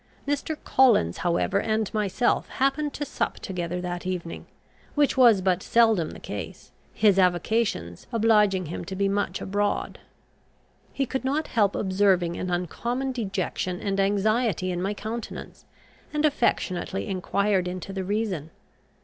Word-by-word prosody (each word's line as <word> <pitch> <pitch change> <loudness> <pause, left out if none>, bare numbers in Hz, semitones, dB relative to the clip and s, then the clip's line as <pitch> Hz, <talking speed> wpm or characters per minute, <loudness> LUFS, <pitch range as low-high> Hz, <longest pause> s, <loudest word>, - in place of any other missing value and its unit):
Mr. 290 +2 -1
Collins, 235 - +4
however, 180 +3 +1
and 220 -1 -1
myself 215 +3 +1
happened 275 +3 0
to 290 - -4
sup - - -2
together 180 -1 -4
that 175 -1 -4
evening, 180 -2 -5 0.5
which 290 -1 +3
was 235 -7 +6
but 185 -1 +1
seldom 225 -9 +3
the - - -10
case, - - -7 0.2
his 200 -3 +3
avocations 180 - 0
obliging 210 -5 +3
him 160 - -5
to 190 - -6
be 200 +1 +1
much 195 -2 -1
abroad. 205 +1 -1 0.9
He 275 - -1
could 265 +1 -3
not 290 +4 -1
help 205 -4 +2
observing 185 -3 +2
an 185 - -3
uncommon 235 +10 -2
dejection 190 -5 -2
and 195 -1 -2
anxiety 205 -1 +1
in 175 0 -2
my 200 +3 -1
countenance, 225 +3 -7 0.5
and 300 0 +1
affectionately 195 -10 0
enquired 195 0 0
into 185 +2 -5
the 190 -1 -3
reason. 195 -6 -2
200 Hz, 140 wpm, -26 LUFS, 185-230 Hz, 0.9 s, was